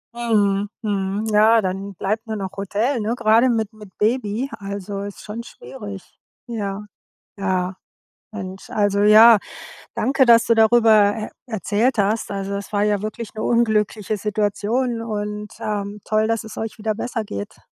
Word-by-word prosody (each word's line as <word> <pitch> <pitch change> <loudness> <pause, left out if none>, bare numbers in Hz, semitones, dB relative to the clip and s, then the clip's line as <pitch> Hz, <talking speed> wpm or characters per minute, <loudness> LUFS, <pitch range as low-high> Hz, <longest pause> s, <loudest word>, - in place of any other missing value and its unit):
Mhm. 205 -4 +1
Mhm. 200 0 -1
Ja, 220 +2 +6
dann 195 +1 -4
bleibt 215 +5 -2
nur 220 - -3
noch 195 -1 -5
Hotel, 210 +6 -1
ne, 220 +3 -1
grade 230 +2 +4
mit 220 -2 -1
mit 210 -2 -13
Baby, 225 +2 0
also 200 0 -5
ist 200 0 -8
schon 215 +2 -6
schwierig. 205 -7 -9 0.4
Ja. 210 -3 -4 0.5
Ja. 185 -1 -1 0.6
Mensch, 190 +1 -8
also 205 -1 +1
ja, 215 +2 +8 0.6
danke, 270 0 +2
dass 230 0 +6
du 230 - +4
darüber 220 -2 +5
e 215 - -4 0.2
erzählt 220 +2 0
hast. 205 +2 +1
Also, 195 0 -4
das 200 +1 -5
war 205 0 +1
ja 210 -1 +1
wirklich 215 +1 -5
'ne 215 - -4
unglückliche 215 -3 +1
Situation 215 +4 -1
und, 210 -1 -4
ähm, 205 0 -3
toll, 215 0 +1
dass 225 0 0
es 220 - -10
euch 220 0 -4
wieder 215 0 -1
besser 225 0 -3
geht. 100 - -8
210 Hz, 155 wpm, -21 LUFS, 200-225 Hz, 0.6 s, ja